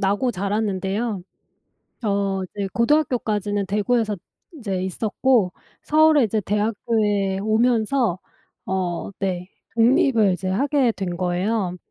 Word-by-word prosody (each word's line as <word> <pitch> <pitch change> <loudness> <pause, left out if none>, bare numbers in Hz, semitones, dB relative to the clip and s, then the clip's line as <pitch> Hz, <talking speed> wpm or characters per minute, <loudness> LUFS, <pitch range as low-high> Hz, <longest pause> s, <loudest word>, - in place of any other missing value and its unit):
나고 205 +6 +1
자랐는데요. 200 +1 -2 0.8
어 200 -2 0
이제 195 +2 -4
고등학교까지는 225 -7 +1
대구에서 210 +1 0 0.3
인제 200 - -4
있었고 215 +1 +1 0.3
서울에 310 -2 +5
이제 220 -1 0
대학교에 205 -1 0
오면서 220 -1 +1 0.5
어 185 -1 -2
네 185 -1 -2 0.3
독립을 230 -3 +4
이제 185 +1 -3
하게 270 +4 +2
된 190 -3 -4
거예요. 180 +2 -1
205 Hz, 255 characters per minute, -22 LUFS, 190-230 Hz, 0.8 s, 서울에